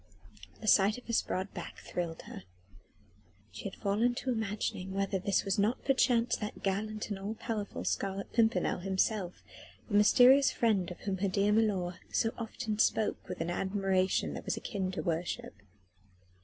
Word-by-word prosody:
The 215 - -6
sight 205 +1 +5
of 250 - -12
his 230 - +2
broad 190 +2 -3
back - - -7
thrilled 170 -2 -4
her. - - -9 1.1
She 105 +2 -9
had - - -4
fallen 220 +4 +1
to 255 - -2
imagining 210 -4 -2
whether 195 0 0
this 195 +2 +1
was 195 0 0
not 220 +6 +1
perchance 250 -3 +3
that 210 -1 -6
gallant 215 +2 -2
and 200 - -3
all 205 +3 -4
powerful 215 -3 -4
Scarlet 195 0 -2
Pimpernel 225 -5 +2
himself: 190 0 -1 0.4
the 220 - -8
mysterious 255 +6 +7
friend 210 -7 +1
of 180 - -9
whom 195 -2 -2
her 200 - +1
dear 200 +2 +2
milor 195 -5 +1
so 225 - +1
often 225 -1 -4
spoke 220 -3 +1
with 180 -2 -5
an 165 +1 -1
admiration 190 0 0
that - - -7
was - - -1
akin 195 -4 -3
to - - -3
worship. 170 - -2
200 Hz, 165 wpm, -31 LUFS, 190-220 Hz, 1.1 s, mysterious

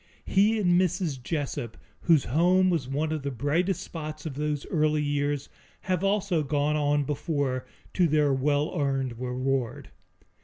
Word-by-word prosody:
He 210 +3 +3
and 180 -3 +3
Mrs. 175 -7 -1
Jessup, 140 -4 -3 0.2
whose 160 -5 +4
home 180 +8 +3
was 155 -7 -1
one 150 +4 -1
of 155 -2 -2
the 140 - -3
brightest 150 +9 0
spots 155 -2 -7
of 155 - -4
those 150 0 -2
early 155 -2 +2
years, 145 -1 -1 0.3
have 185 -1 -1
also 195 -4 +1
gone 145 +1 0
on 145 -1 +2
before 140 -3 -2 0.3
to 180 -2 +3
their 150 -2 +3
well 145 +4 0
earned 135 -4 -1
reward. 125 -1 -2
150 Hz, 150 wpm, -27 LUFS, 140-170 Hz, 0.3 s, whose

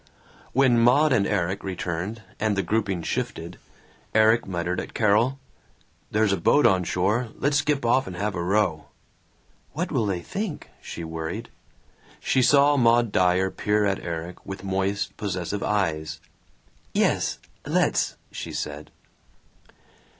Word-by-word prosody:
When 130 -2 +4
Maud 130 +5 +5
and 100 -5 +2
Erik 95 -1 -1
returned 95 +3 -4 0.2
and 110 -1 +1
the 100 - +1
grouping 100 -5 -1
shifted, - - -4 0.6
Erik 110 +1 +4
muttered 90 0 -2
at - - -7
Carol, 115 +5 +3 0.7
"There's 105 -1 +2
a - - +1
boat 145 - +3
on 95 -5 +4
shore. 105 +8 0
Let's 145 +1 +1
skip 145 -2 0
off 130 +3 +3
and 90 - -6
have 105 +3 -2
a 85 - -3
row." 90 -4 +1 0.9
"What - - -3
will 110 - +1
they 90 -3 -1
think?" 195 -4 -5
she 85 - -7
worried. 80 +7 -5 0.7
She 130 - +1
saw 145 +3 +5
Maud 120 -2 +4
Dyer 90 +1 +2
peer 105 0 +1
at 100 -1 0
Erik 85 +1 -6
with 95 -1 -7
moist 100 +1 -1
possessive 100 0 -3
eyes. 80 -7 -1 0.8
"Yes! - - +1 0.3
Let's!" - - +1 0.2
she - - -6
said. 75 +1 -5
100 Hz, 135 wpm, -25 LUFS, 90-115 Hz, 0.9 s, Maud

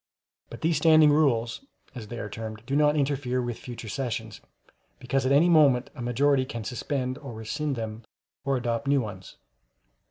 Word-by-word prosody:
But 120 - -10
these 160 -1 +2
Standing 155 -1 +6
Rules, 130 - +1 0.3
as 120 -5 -8
they 120 - -7
are 105 - -4
termed, 110 +1 -7
do 135 +2 -2
not 150 0 +4
interfere 135 -3 0
with 120 -2 -3
future 120 -2 -8
sessions, 110 -2 -4 0.6
because 135 - -1
at - - +1
any 145 +5 +5
moment 145 -7 +4
a 130 - -9
majority 130 +3 +2
can 115 -3 -6
suspend 130 +2 -3
or 135 -5 -8
rescind 110 +7 -3
them, 110 -1 -5 0.4
or 135 -1 +1
adopt 120 +2 -2
new 140 -1 +3
ones. 95 -5 -8
130 Hz, 170 wpm, -27 LUFS, 115-145 Hz, 0.6 s, Standing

